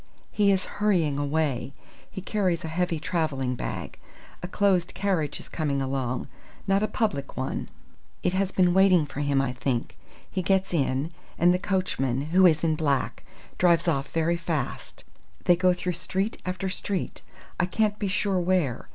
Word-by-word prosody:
"He 205 -1 +3
is 190 -1 +1 0.2
hurrying 170 -9 +2
away. 145 -3 -1 0.4
He 190 - -7
carries 185 -4 0
a - - -4
heavy 170 0 -1
travelling 150 -6 -1
bag. 125 - -5 0.4
A 180 - -4
closed 185 -2 +1
carriage 185 -7 0
is - - -10
coming 145 -4 -1
along 130 -2 -2 0.4
not 195 0 +2
a 215 - +2
public 210 - -2
one. 130 - -3 0.5
It 180 - +1
has 190 0 +1
been 180 -2 +3
waiting 185 -4 +5
for 145 - -8
him 145 -1 +2
I 135 -2 0
think. 125 -1 -2 0.3
He 190 - -2
gets 190 +1 +1
in, 140 0 0 0.3
and 175 +1 +5
the 180 - 0
coachman 140 -10 0
who 185 +1 +7
is 155 -2 +2
in 160 -1 +3
black 140 -4 -1 0.4
drives 170 -1 +4
off 140 -4 +1
very 165 +1 +1
fast. 160 -6 -4 0.4
They 175 - +6
go 185 +1 +3
through 180 0 -2
street 190 +5 -2
after 185 +1 -2
street! 190 0 -3 0.4
I 180 - +2
can't 210 +2 0
be 205 - -1
sure 195 -1 +1
where. 175 - 0
175 Hz, 170 wpm, -26 LUFS, 145-190 Hz, 0.5 s, who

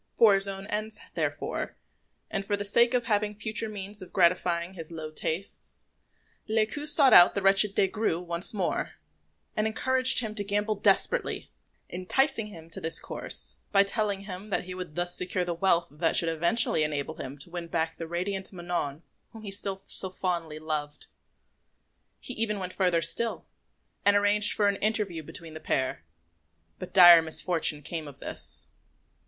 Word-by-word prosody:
For 225 -3 +6
his 195 0 +1
own 195 0 -6
ends, 215 +1 -4 0.2
therefore, - - -3 0.6
and 195 -2 -2
for 205 +1 -2
the 205 - -3
sake 235 +4 +3
of 245 - +1
having 210 -1 -1
future 220 +1 -1
means 205 0 -6
of 185 - -11
gratifying 175 -1 +1
his 165 -3 -9
low 160 -2 -7
tastes, 165 +5 -5 0.6
Lescaut 225 +7 0
sought 285 -3 +7
out 175 - +8
the 200 - 0
wretched 195 +1 +4
Des 195 - +3
Grieux 200 -4 -1
once 170 0 0
more, 200 -4 -2 0.6
and 215 +1 0
encouraged 260 +3 +4
him 220 -3 -5
to 205 - -2
gamble 205 +2 -1
desperately, 205 - 0 0.4
enticing 225 +6 -1
him 165 -6 -12
to - - 0
this 160 - +4
course - - -1
by 200 -1 +5
telling 200 -1 -1
him 195 +1 -9
that - - -1
he 185 0 -8
would 180 -4 -8
thus 175 0 0
secure 180 0 -1
the 175 - -2
wealth 170 -1 +1
that 160 +3 -1
should 165 - +4
eventually 170 +2 +2
enable 150 0 -3
him 135 +2 -7
to 145 +5 -8
win 175 -1 -6
back 165 -1 -2
the 165 - -6
radiant 190 +3 -3
Manon 175 -4 -4 0.3
whom 220 -1 -11
he 200 - -6
still 195 -1 -4
so 190 - -2
fondly 170 -4 -3
loved. 155 -1 -4 1.1
He 255 - -5
even 220 -2 -1
went 185 -1 -5
further 180 -3 +1
still, 225 +8 0 0.6
and 205 0 +4
arranged 205 +1 +3
for 205 - +1
an 200 -1 0
interview 205 -6 -1
between 160 +1 -9
the 155 - -8
pair; 130 - -2 0.8
but - - -8
dire 175 -3 +9
misfortune 160 -2 +1
came 160 0 -5
of 140 - -12
this. - - -4
190 Hz, 170 wpm, -27 LUFS, 170-210 Hz, 1.1 s, dire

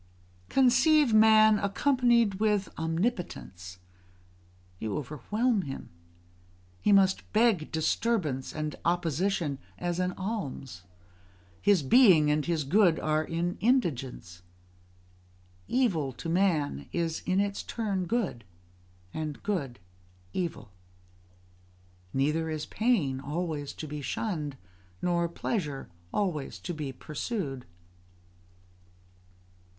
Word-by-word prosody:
Conceive 265 +1 +4
man 215 -1 +6
accompanied 235 -1 +2
with 210 -3 +1
omnipotence: 160 - -3 1.0
you 110 +4 -3
overwhelm 205 - -1
him; 135 -6 -7 0.9
he - - +3
must 195 -1 +3
beg 215 -8 +3
disturbance 160 - 0
and 155 -1 -4
opposition 170 -2 0 0.2
as 175 0 -2
an 180 0 0
alms: 145 - -5 0.8
his 200 -7 +4
being 160 - +6
and 150 +1 0
his 165 -3 0
good 170 +3 +4
are 155 0 +1
in 170 +2 -2
indigence. 135 - 0 1.3
Evil 175 - +1
to 165 - -7
man 165 - 0
is 165 -2 -1
in 185 +1 +2
its 200 0 -1
turn 200 -5 -2
good, 190 - -1 0.7
and 155 -2 -5
good 150 -12 -2 0.6
evil. 170 - -4 1.4
Neither 150 +4 0
is 155 -1 -3
pain 190 - +1
always 150 0 -3
to 155 - -7
be 150 0 -5
shunned, 150 - -3 0.4
nor 170 -1 0
pleasure 155 - -3 0.2
always 175 -9 -2
to 175 - -5
be 150 -4 -4
pursued. 145 - -4
170 Hz, 100 wpm, -29 LUFS, 150-210 Hz, 1.4 s, man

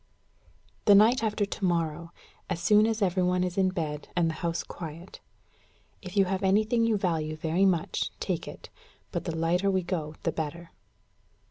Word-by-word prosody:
"The 205 - +7
night 220 +5 +5
after 210 -1 0
to 200 - -7
morrow, 170 -2 -1 0.4
as 180 -2 -2
soon 210 +4 +4
as 225 -2 0
every 185 -1 +1
one 180 0 +2
is 180 -1 -2
in 190 -1 +3
bed 155 -5 -4
and 170 -2 +2
the 155 - -9
house 170 -1 -1
quiet. 165 +2 -9 0.8
If 185 +1 -8
you 195 - +5
have 190 0 -2
anything 215 +4 +2
you 220 -2 +2
value 160 -5 -1
very 165 +5 +2
much, 175 -3 0
take - - -3
it; - - -10 0.4
but - - -3
the 165 -3 -3
lighter 175 +4 +1
we 190 -1 +1
go 160 -4 -3
the 165 - +1
better." 160 +2 -5
180 Hz, 175 wpm, -28 LUFS, 165-195 Hz, 0.8 s, The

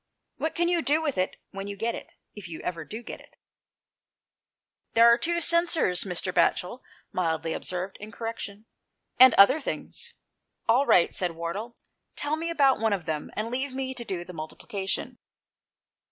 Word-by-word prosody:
What 315 - -2
can 345 0 +2
you 345 -1 +2
do 300 +1 +2
with 305 -4 -1
it 185 - 0 0.2
when 195 0 -6
you 200 - -5
get 230 +3 -1
it, - - -9 0.2
if 205 -3 -9
you 160 - -7
ever 170 -2 -4
do 220 +9 -8
get - - -8
it? - - -21 0.8
" - - -60
"There 230 +1 +7
are 235 - +8
two 340 +6 0
censers," 335 - +3
Mr. 180 0 -2
Batchel 185 +8 +1 0.3
mildly 165 -2 -1
observed 185 +2 -4
in 210 +1 -10
correction, 225 -2 -6 0.3
" - - -44
and 260 0 +9
other 260 +10 +7
things." - - -6 0.5
"All 250 +5 +4
right," 175 - +5
said 180 -2 -1
Wardle; 195 +8 -5 0.4
"tell 290 +1 -1
me 330 +2 -3
about 280 -5 +3
one 220 -1 +2
of 185 -5 -3
them, 155 -2 -3
and 220 +2 -3
leave 260 +1 -3
me 260 0 -2
to 245 - -6
do 180 -6 -4
the 180 - -10
multiplica 190 +5 -6
tion." - - -3
220 Hz, 180 wpm, -27 LUFS, 180-270 Hz, 0.8 s, and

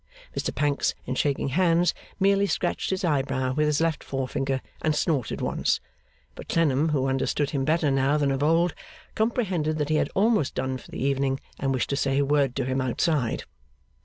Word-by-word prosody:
Mr - - -1
Pancks 145 0 +1
in 130 - -2
shaking 140 +1 0
hands 175 +3 +3 0.3
merely 200 +1 +3
scratched - - -1
his 190 0 -1
eyebrow 135 -4 0
with 150 +2 +1
his 150 -1 +1
left 165 -2 0
forefinger 135 0 -2 0.2
and 155 -1 +1
snorted 145 - 0
once, - - 0 0.5
but - - -11
Clennam, 155 -2 +2
who 140 -4 +1
understood 135 +2 0
him 135 -2 -1
better 155 -1 +2
now 135 +2 +2
than 145 -2 +1
of 135 0 -1
old, 165 +3 +3 0.4
comprehended 190 -9 0
that 150 -1 -1
he 155 - +3
had - - +1
almost 205 - +2
done 130 0 -2
for - - -15
the - - -7
evening 135 -1 +1 0.2
and 135 0 0
wished 130 +1 -1
to - - +1
say 135 -1 0
a 140 - +3
word 140 -2 +2
to 135 - -1
him 130 +1 0
outside. 130 0 0
145 Hz, 190 wpm, -26 LUFS, 135-165 Hz, 0.5 s, hands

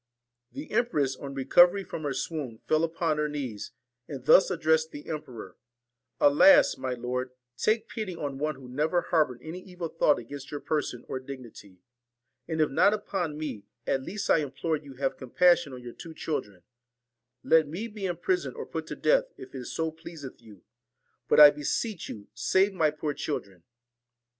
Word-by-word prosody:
34 290 +2 -6
The - - -12
empress 145 - 0
on 140 0 -8
recovery 175 +8 +5
from 165 - -7
her 145 -3 -2
swoon, 140 -9 -4
fell 155 - +3
VALEN 165 0 0
upon 165 -2 0
her 150 0 0
knees, 130 -8 -5 0.4
and 135 -3 -8
thus 190 - +7
addressed 160 -3 +2
the 145 -1 -10
emperor: 125 - -7 0.6
'Alasl 145 - +6
my 130 -1 -2
lord, 125 +1 -3 0.3
take 215 - +1
pity 210 -5 -5
on 140 -4 -5
one 155 0 -1
who 130 -1 -12
never 155 +7 0
harboured 150 -8 0
an 160 - -7
evil 180 -2 -7
thought 150 -3 +3
against 135 +3 -8
your 145 - -5
person 145 -6 -2
or 130 - -4
dignity; 120 -8 -11 0.7
and 160 -1 -3
if 155 - +2
not 200 +9 +4
upon 180 -7 -3
me, 150 -10 -6 0.2
at 135 - 0
least 195 +9 -5
I - - +4
implore 155 +3 -2
you 145 -3 -13
have 135 +1 -2
compassion 170 +3 +3
on 125 -1 -9
your 120 -1 -8
two 165 -2 -10
children 105 - -4 0.8
1 - - -11
Let 160 -2 +6
me 180 +10 -5
be 210 -3 -5
imprisoned 180 - -1
or - - -6
put - - -5
to - - -5
death, - - +3
if - - -11
it 130 -2 -6
so 160 +4 -2
pleaseth 160 -5 -10
you; 105 -5 -16 0.6
but, - - +4
I 150 -1 +11
beseech 160 - -3
you, 100 -1 -8
save 190 - +2
my 160 -5 +2
poor 150 0 -3
children 100 - -5
150 Hz, 180 wpm, -28 LUFS, 130-170 Hz, 0.8 s, I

